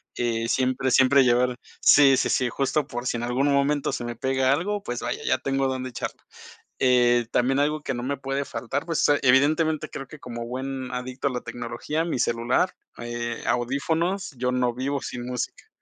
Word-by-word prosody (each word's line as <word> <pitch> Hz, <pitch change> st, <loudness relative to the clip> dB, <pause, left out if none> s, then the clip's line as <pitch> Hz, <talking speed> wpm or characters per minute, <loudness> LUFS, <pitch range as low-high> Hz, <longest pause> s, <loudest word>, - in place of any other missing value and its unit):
eh, 115 Hz, -1 st, -1 dB
siempre, 130 Hz, 0 st, +1 dB
siempre 135 Hz, +2 st, +6 dB
llevar 125 Hz, 0 st, +2 dB, 0.2 s
Sí, 135 Hz, -2 st, +7 dB
sí, -, -, +1 dB
sí, 130 Hz, -2 st, +1 dB
justo 135 Hz, +3 st, 0 dB
por 120 Hz, -2 st, -5 dB
si 120 Hz, -, 0 dB
en 115 Hz, -, -4 dB
algún 130 Hz, +4 st, +1 dB
momento 145 Hz, +1 st, +1 dB
se 120 Hz, -, -3 dB
me 120 Hz, 0 st, -4 dB
pega 130 Hz, +2 st, +1 dB
algo, 205 Hz, +7 st, -1 dB
pues 120 Hz, 0 st, -4 dB
vaya, -, -, -3 dB
ya 130 Hz, -, +3 dB
tengo 135 Hz, 0 st, 0 dB
dónde 130 Hz, -1 st, -3 dB
echarla. 120 Hz, -, -6 dB, 0.6 s
Eh, 120 Hz, -2 st, +4 dB
también 130 Hz, +2 st, +2 dB
algo 150 Hz, +1 st, +1 dB
que 135 Hz, -, -3 dB
no 120 Hz, -, -4 dB
me 140 Hz, +1 st, -2 dB
puede 135 Hz, +1 st, -3 dB
faltar, 140 Hz, +6 st, -4 dB
pues, 165 Hz, -2 st, +1 dB
ah, 145 Hz, -, +5 dB
evidentemente, 150 Hz, +4 st, +3 dB
creo 135 Hz, -, -7 dB
que, 155 Hz, -, -12 dB
como 120 Hz, -2 st, -6 dB
buen 130 Hz, +1 st, -4 dB
adicto 125 Hz, +2 st, -3 dB
a -, -, -5 dB
la 125 Hz, -1 st, -3 dB
tecnología, 120 Hz, +7 st, -3 dB
mi 165 Hz, -7 st, -2 dB
celular, 120 Hz, +10 st, +1 dB, 0.3 s
eh, 120 Hz, 0 st, -4 dB
audífonos, 160 Hz, +10 st, 0 dB
yo 125 Hz, +1 st, 0 dB
no 125 Hz, -1 st, +1 dB
vivo 135 Hz, +2 st, -2 dB
sin 120 Hz, -1 st, -6 dB
música. 125 Hz, -1 st, -5 dB
130 Hz, 195 wpm, -25 LUFS, 120-140 Hz, 0.6 s, Sí